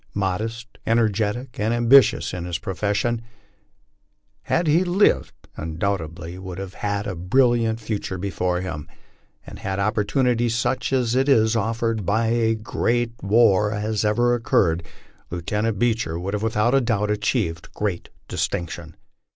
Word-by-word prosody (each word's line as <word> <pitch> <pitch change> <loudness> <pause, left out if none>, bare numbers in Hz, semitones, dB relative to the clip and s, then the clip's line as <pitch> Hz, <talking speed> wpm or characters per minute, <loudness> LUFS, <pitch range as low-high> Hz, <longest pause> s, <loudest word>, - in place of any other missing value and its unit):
Modest, 110 +4 -3
energetic, 115 +3 0
and 110 +3 +1
ambitious 120 0 +5
in 90 -1 -4
Ins 85 -2 -2
profession, 105 +6 -1 1.2
had 175 - +1
he 160 +4 +4
lived 185 +3 +2 0.2
he - - -7
undoubtedly 85 +1 -3
would 95 -2 -7
have 95 -1 -6
had 100 0 -2
a 95 - -3
bril 110 +9 +3
liant 115 -1 0
future 105 -4 -4
before 90 -1 -1
him 80 -5 -6 0.6
and - - -10
had 95 0 -3
opportunity 115 +4 +1
such 125 +3 -1
as 125 -3 +1
is 130 -4 +3
offered 115 0 -1
by 110 +4 +1
a 115 -1 +2
great 120 +2 0
LIFE - - -17
ON - - -5 0.4
THE 105 - -3
PLAINS. 110 0 -1
rar 105 - +3
ever 120 +3 +2
have 120 -1 0
occurred, 90 - +2 0.5
Lieutenant 105 +5 -2
Beecher 110 -7 0
would 95 +3 -4
have 105 - -1
without 115 +4 +2
doubt 105 -3 0
achieved 100 -5 -1
great 100 -5 -3 0.2
distinction. 85 -1 -3
110 Hz, 150 wpm, -23 LUFS, 95-120 Hz, 1.2 s, ambitious